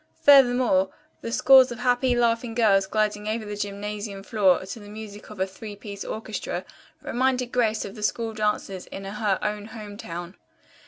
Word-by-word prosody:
Furthermore, 245 -8 +5 0.3
the 230 - -5
scores 260 +1 +6
of 240 - -5
happy, 245 +1 +2
laughing 230 -1 +1
girls 200 -4 +4
gliding 210 0 0
over 220 0 -2
the 205 0 -5
gymnasium 205 0 -5
floor 190 -3 +2
to 195 +4 -7
the 205 -1 -12
music 210 -1 -9
of 210 -2 -11
a 190 - +2
three 205 +2 -9
piece 200 -1 -8
orchestra 220 -1 -5 0.4
reminded 250 0 0
Grace 225 -3 +1
of 195 - -7
the 215 - -10
school 225 +1 -1
dances 210 -3 -2
in 195 - -8
her 200 0 -1
own 210 -1 -2
home 210 -2 -9
town. 175 -1 -7
215 Hz, 170 wpm, -25 LUFS, 200-230 Hz, 0.4 s, scores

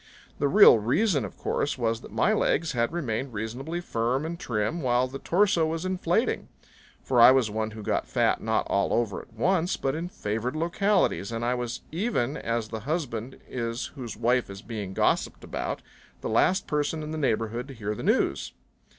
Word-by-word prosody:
The 145 - +2
real 170 - +8
reason 140 - +2
of 95 - -9
course 145 - -1
was 115 -2 0
that - - -12
my - - +2
legs 165 -1 +1
had 120 +1 0
remained 135 -6 -3
reasonably 125 +11 -4
firm 125 -1 -1
and 170 +1 -5
trim 115 +9 -1
while 125 -1 +2
the 135 +2 -7
torso 175 -2 +2
was 165 +2 -3
inflating. 185 +4 0 0.6
For 125 -3 +3
I 120 - +11
was 130 -5 +3
one 110 +1 -1
who 110 -1 -9
got - - -1
fat - - +1
not - - 0
all 100 - +1
over 115 -5 0
at - - -19
once 175 - +1
but 135 - -1
in 165 +3 -4
favored 115 - -3
localities. 175 - +1
And 115 0 -2
I 125 - +2
was 125 -1 -3
even 160 - -1
as 115 -5 -2
the 110 - -4
husband 130 -3 -4
is 115 0 -3
whose 120 -7 -7
wife 120 +1 +1
is 100 +2 -9
being 105 -5 -5
gossiped - - +1
about - - -4 0.4
the - - -3
last 180 - +3
person 150 +1 -1
in 150 - -5
the 160 - -3
neighborhood 115 -2 -1
to 135 - -9
hear 105 -2 -3
the - - -7
news. 70 0 +1
125 Hz, 190 wpm, -27 LUFS, 115-160 Hz, 0.6 s, I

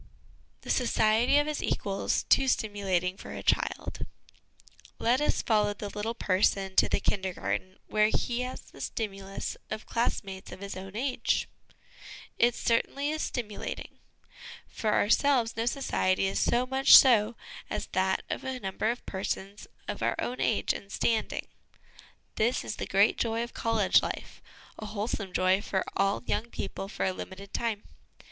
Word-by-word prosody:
The - - -3
Society 235 +1 +3
of 290 - +4
his 305 -1 -2
Equals 195 -1 -1
too 270 - +4
stimulating 195 -6 0
for - - -9
a - - -6
Child. - - 0 0.9
Let 245 +4 +2
us 295 - +1
follow 210 -2 +2
the 205 0 -6
little 215 +3 -3
person 190 -1 +1
to - - +5
the - - +1
Kindergarten, 185 -1 -2
where 215 0 +3
he 240 +2 -1
has 250 0 -5
the - - -14
stimulus 195 -3 -4
of 215 - -5
class 235 -1 0
mates 190 -1 -9
of - - -9
his 200 0 -6
own 190 +1 -8
age. 250 0 0 0.9
It 240 0 +4
certainly 275 +5 0
is 310 0 -2
stimulating. 215 -4 -5 0.7
For 215 - -2
ourselves, 235 +2 +3
no 230 +1 -1
society 195 -8 +1
is 195 - 0
so 245 +1 +2
much 265 +1 +8
so 230 -3 +5 0.3
as - - -3
that 190 0 +1
of - - -4
a 260 -1 -3
number 195 +1 -1
of 240 +2 -3
persons 195 +1 -4 0.2
of - - -4
our - - +1
own 250 - -3
age 220 - +1
and 200 - -9
standing; 225 -2 0 0.9
this 235 +3 +1
is 215 - -5
the - - -4
great 200 +3 +3
joy 230 0 0
of 240 - -8
college 225 -4 +3
life; - - -6 0.4
a 215 - -6
wholesome 205 -2 -3
joy 185 +2 +3
for 195 -3 -1
all 195 +3 +1
young 235 - -1
people 195 - -5
for - - -3
a 190 - 0
limited 195 +2 -9
time. 225 -3 -1
215 Hz, 160 wpm, -29 LUFS, 195-240 Hz, 0.9 s, much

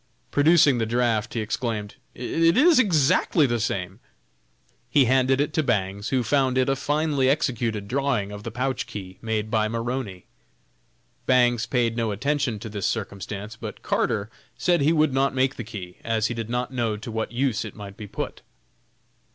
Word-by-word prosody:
Producing 145 -3 +5
the 115 - 0
draft, 115 -1 0
he 115 - 0
exclaimed, 110 -1 -3 0.2
"it 165 - +2
is 310 +1 +6
exactly 160 - +3
the 120 -3 0
same!" 100 -3 -3 0.9
He 140 -3 +4
handed 130 +1 +3
it 145 +2 0
to 155 - +2
Bangs, 100 -6 -1
who 130 -2 +1
found 130 +1 +1
it 130 - +3
a 135 - +2
finely 145 -1 +1
executed 120 -8 0
drawing 125 -5 0
of 105 0 -7
the 115 - -5
pouch 125 +2 -2
key, 95 -2 -8
made 110 -1 -2
by 110 -2 +2
Maroney. 115 -4 -4 1.0
Bangs 120 -2 +3
paid 115 -1 +1
no 115 -2 0
attention 130 +2 -1
to 110 - -7
this 100 -3 -2
circumstance, 105 0 -4
but - - -8
Carter 105 0 0 0.3
said 175 -3 +2
he 145 +3 +4
would 155 -4 +2
not 135 0 +1
make 130 +1 +1
the 120 - -5
key, 100 -6 -8
as 110 -1 0
he 120 - 0
did 115 -1 -5
not 125 +2 -2
know 115 -4 -1
to 115 +2 -7
what 110 0 -3
use 125 -1 0
it - - -8
might 100 -2 -9
be 105 - -8
put. - - -5
120 Hz, 175 wpm, -24 LUFS, 110-135 Hz, 1.0 s, is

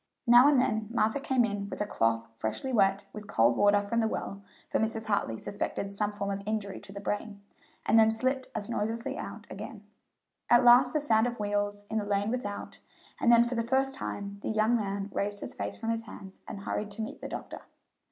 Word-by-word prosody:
Now 240 +2 +8
and 290 -3 +5
then 220 -4 0
Martha 220 +2 +1
came 260 -3 +2
in 200 -2 -4
with - - -6
a 210 - 0
cloth 115 - 0
freshly 115 - -3
wet 195 -3 +3
with 210 -1 -8
cold 115 - +3
water 205 +3 +4
from 230 +3 -1
the 225 - +2
well 200 -2 -4 0.3
for - - 0
Mrs. 220 0 -1
Hartley 200 - 0
suspected 200 - -4
some 205 +1 -1
form 200 -1 -3
of 195 0 -3
injury 210 -2 -2
to - - -9
the 200 - -7
brain 205 +1 -4 0.4
and 225 - +5
then 220 0 +6
slipped 260 +4 -1
as 210 -2 -2
noiselessly 230 0 -2
out - - -7
again. - - -8 0.7
At 240 +1 +6
last 250 +1 +7
the 305 - +1
sound 225 -5 +3
of 240 -1 -5
wheels 205 0 -1
in 220 - +1
the - - -2
lane 205 +1 0
without, 205 -5 -4 0.4
and 240 - +4
then 235 0 +7
for 240 +1 -3
the 230 - 0
first 265 +3 +1
time 200 -5 -5
the - - -3
young 220 +2 +2
man 200 -2 -2
raised 205 0 -2
his - - -5
face - - -4
from 225 0 -2
his 230 0 -1
hands 200 -3 -12
and 200 - -7
hurried 210 +1 -3
to 220 +2 -3
meet 220 - -7
the - - -5
doctor. - - -7
215 Hz, 220 wpm, -29 LUFS, 200-235 Hz, 0.7 s, Now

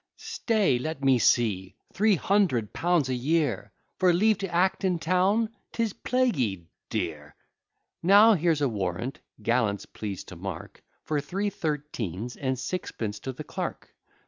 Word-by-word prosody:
Stay! 210 - +1
let 155 +1 -4
me 135 -2 +4
see 100 -7 +2 0.2
Three 210 +1 +4
hundred 170 - +1
pounds 170 -5 +2
a 130 - -1
year, 140 - 0 0.3
For 185 -1 +5
leave 210 +4 +3
to 195 -2 -4
act 185 +4 +1
in 185 -2 +2
town! 190 +7 +2 0.2
'Tis 225 -4 -1
plaguy 135 - 0 0.2
dear. 80 -8 -4 0.7
Now, 205 +5 +7
here's 165 -4 +1
a 140 - +3
warrant; 100 +2 -3 0.2
gallants, 115 -3 +1
please 100 -3 -6
to - - -11
mark, - - -7 0.2
For 150 -2 -1
three 195 +8 -2
thirteens, 125 - -4
and 130 -1 -2
sixpence 115 - -4
to 130 - -5
the 130 +4 -8
clerk. - - -5
150 Hz, 145 wpm, -27 LUFS, 115-185 Hz, 0.7 s, Now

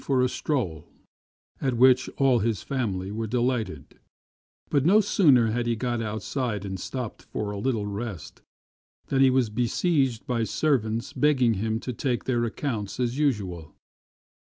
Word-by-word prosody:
24 130 -2 +2
STRANGE - - -8
STORIES 95 - -2 0.8
at 130 -3 0
which 130 +1 +5
all 135 -3 +4
his 110 -2 -1
family 100 -8 -2
were 110 +1 -3
delighted; 120 - -2 0.7
but 140 - +3
no 195 +7 +6
sooner 140 - +4
had 120 +1 -1
he 120 - +1
got 120 0 -2
outside 110 0 -3
and 95 -1 -5
stopped 125 +3 -5
for 105 -1 -4
a 100 - -5
little 110 -2 -1
rest 100 -5 -6 0.7
than 135 -1 +2
he 135 - +7
was 130 -4 +2
besieged 125 +2 0
by 120 -2 0
servants 115 -3 0
begging 130 -6 +3
him 110 +2 -1
to 125 - -5
take 125 0 -1
their 120 -2 0
accounts 115 -3 -4
as 125 +2 -1
usual. 95 - -1
120 Hz, 155 wpm, -26 LUFS, 105-130 Hz, 0.8 s, he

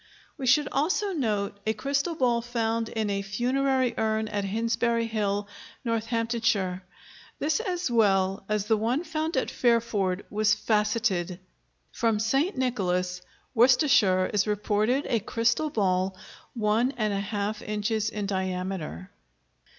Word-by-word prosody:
We 270 -5 -4
should 295 +4 +4
also 370 +7 0
note 210 - -1
a 220 - 0
crystal 280 +9 -1
ball 245 -5 +2
found 230 -1 -1
in 220 -2 -2
a 200 0 -1
funerary 255 +5 0
urn 220 0 0
at 205 -1 -2
Hinsbury 230 +3 0
Hill, 205 -2 -1 0.4
Northamptonshire; 230 -4 0 0.6
this 305 +6 0
as 365 - -2
well 195 -4 +2
as 210 -1 0
the 220 +1 +2
one 240 +9 0
found 315 -2 -2
at - - 0
Fairford 220 -6 +1
was 215 +1 +3
facetted. 210 -5 0 0.5
From 225 -2 +1
St. 270 - +1
Nicholas, 180 -8 -1 0.3
Worcestershire, 235 - +4
is 205 0 +2
reported 210 +5 +1
a 235 - +1
crystal 230 +8 0
ball 190 -5 0 0.4
1½ 210 -2 0
inches 210 +1 -1
in 210 -1 -4
diameter. 185 - -3
220 Hz, 120 wpm, -27 LUFS, 200-245 Hz, 0.6 s, should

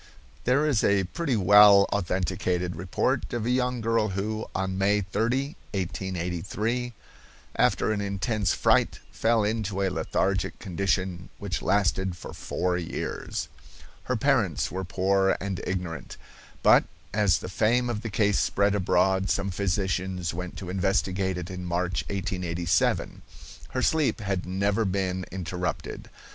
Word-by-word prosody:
There 135 +5 +3
is 140 -8 +2
a 100 -1 +3
pretty 140 - -2
well 100 0 +7
authenticated 90 -1 -1
report 90 +2 -1
of 120 -2 -2
a 120 - +1
young 125 -1 0
girl 115 -1 +2
who, 105 +3 -3
on 95 0 -1
May 100 +1 +3
30, 120 - -1 0.2
1883, 95 +6 -2 0.6
after - - +2
an 105 -1 -1
intense 100 +1 0
fright, - - +2
fell 115 -1 +2
into 105 -2 -1
a 95 - +1
lethargic 95 +1 -1
condition 95 -2 -2
which 100 -4 -3
lasted 95 -2 +1
for - - -9
four 90 -1 -1
years. 85 -2 -4 0.6
Her 125 - 0
parents 110 - +1
were 95 +1 -3
poor 95 +1 +2
and 95 -2 -3
ignorant, 90 -3 -4 0.5
but, - - +6 0.3
as 100 -3 +3
the - - -7
fame 115 +6 +2
of 115 -3 -2
the 115 - -4
case 105 0 +2
spread 100 0 +2
abroad, 95 0 +2
some 100 0 0
physicians 95 -2 -1
went 90 +1 -6
to 90 -2 -6
investigate 95 0 0
it 90 +1 -5
in 90 -1 -6
March, 90 +1 -1
1887. 90 -3 0 0.5
Her 130 - -2
sleep 155 -6 +2
had 95 -4 -2
never 100 +4 +1
been 95 -2 -1
interrupted. 90 0 -4
95 Hz, 135 wpm, -27 LUFS, 90-105 Hz, 0.6 s, well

